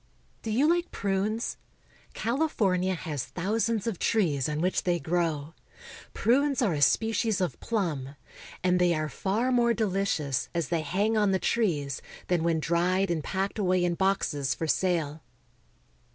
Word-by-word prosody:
Do 225 - -5
you 255 +8 +3
like 345 +1 +2
prunes? 205 +3 -1 0.6
California 210 - +1
has 155 -6 -4
thousands 220 +3 -1
of 225 -7 -2
trees 155 - +1
on 150 0 -2
which 180 +3 +1
they 175 -1 0
grow. 165 -1 -1 0.6
Prunes 275 +4 +2
are 200 -7 +2
a 145 - -2
species 220 +4 +2
of 180 -2 -2
plum, 155 - -2 0.5
and 180 0 +3
they 175 -1 +3
are 155 0 -2
far 210 - -1
more 235 -2 +3
deli 195 -3 0
cious 140 -8 -1
as 170 -2 -1
they 170 -2 0
hang 200 +9 0
on 205 -2 +3
the - - +3
trees 155 - 0 0.3
than 175 -3 +2
when 165 -1 +1
dried 175 +4 +1
and 160 -3 -1
packed 195 +2 -2
away 185 -2 +2
in 175 - +1
boxes 170 -7 0
for 165 - -3
sale. 160 -3 0
185 Hz, 155 wpm, -28 LUFS, 160-215 Hz, 0.6 s, you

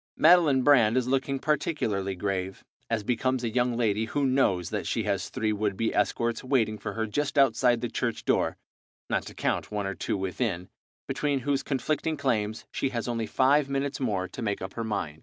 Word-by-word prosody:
Madeline 155 -6 +5
Brand 125 -5 +5
is 125 -1 +1
looking 135 +1 0
particularly 130 - -1
grave, 95 0 -3 0.2
as 115 -2 0
becomes 125 +3 0
a 115 - 0
young 125 -1 +1
lady 110 -2 +1
who 140 +5 -1
knows 115 -10 +1
that - - -3
she - - 0
has - - -1
three 110 -1 -1
would 105 -2 -1
be 115 +1 0
escorts 115 0 0
waiting 115 -5 +1
for - - -5
her 110 0 -1
just 145 +7 -2
outside 125 -3 +4
the 120 - -1
church 115 0 -3
door, - - +1 0.5
not - - 0
to - - -10
count - - -1
one 105 -1 -2
or 95 - -2
two 100 - -2
within, 95 -1 -2 0.4
between 145 -2 -1
whose 140 +1 0
conflicting 155 +3 -1
claims 110 -6 -1
she 135 - -1
has 120 -2 -3
only 115 -2 -2
five 140 +2 +3
minutes 140 0 -2
more 100 -8 -1
to 125 - -8
make 100 -3 -1
up 95 0 -6
her 115 - -3
mind. 80 -9 -3
120 Hz, 195 wpm, -27 LUFS, 105-135 Hz, 0.5 s, Madeline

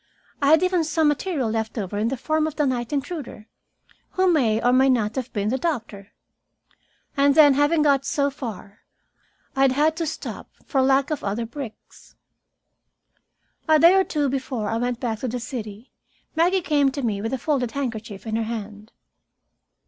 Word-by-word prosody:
I 280 - +2
had 315 +4 +5
even 365 -2 +2
some 315 0 +1
material 295 -2 -1
left 220 +1 -3
over 205 -2 -4
in 220 - +1
the 265 +3 -2
form 310 +4 0
of 315 - -6
the 300 - +1
night 245 -3 -2
intruder, 280 -6 -5 0.7
who 370 -1 +3
may 225 -8 +2
or 245 +2 +2
may 265 +1 +4
not 225 -4 +1
have 255 -1 -4
been 205 -1 -1
the 260 +3 -1
doctor. 230 - -3 1.1
And 280 0 +3
then, 295 -3 +7
having 290 +3 +2
got 280 -2 +3
so 280 0 0
far, 220 -6 -8 0.8
I 270 - 0
had 270 -1 +4
had 310 +3 +2
to 330 -2 -2
stop - - -6 0.2
for 270 - +1
lack 270 +2 +2
of 305 - -3
other 210 +4 -2
bricks. 240 -1 -10 1.5
A 315 - +7
day 335 +4 +7
or 385 0 +4
two 295 -5 -1
before 255 -5 -3
I 225 - -1
went 245 0 -2
back 225 -3 -3
to 255 - -3
the 245 +1 -3
city, 230 -3 -7 0.4
Maggie 355 +4 +3
came 285 -3 +2
to 280 - -4
me 210 -4 -1
with 225 - -3
a 265 - -1
folded 255 -2 -1
handkerchief 230 -7 -5
in 220 0 -2
her - - 0
hand. 215 -1 -7
265 Hz, 185 wpm, -23 LUFS, 225-295 Hz, 1.5 s, then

